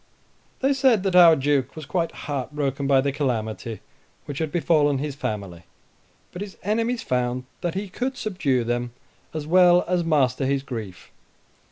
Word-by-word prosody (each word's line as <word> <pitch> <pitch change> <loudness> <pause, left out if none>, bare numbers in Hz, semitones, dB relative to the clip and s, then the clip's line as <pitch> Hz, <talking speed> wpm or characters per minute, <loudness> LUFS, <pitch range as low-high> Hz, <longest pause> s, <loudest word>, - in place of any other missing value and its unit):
They 270 +1 +3
said 260 -7 +3
that 190 -2 0
our 170 -2 +8
Duke 140 -2 0
was 155 -2 -7
quite 170 0 -1
heart 140 -2 -4
broken 140 -1 -1
by 135 -1 +4
the 140 +1 0
calamity 115 -5 -3 0.4
which 140 -2 -6
had 160 -2 -2
befallen 150 -3 +2
his 145 +1 -3
family; 100 -10 -5 0.7
but 180 - -8
his 205 -2 -7
enemies 230 +4 0
found 125 0 -1 0.2
that 175 -1 -2
he 200 +2 -3
could 250 +7 -3
subdue 145 - 0
them, 120 +1 -2 0.4
as 155 -2 -5
well 180 +1 +5
as 180 -1 +1
master 135 -5 +1
his 140 0 0
grief. 110 -9 -7
145 Hz, 165 wpm, -24 LUFS, 130-180 Hz, 0.7 s, our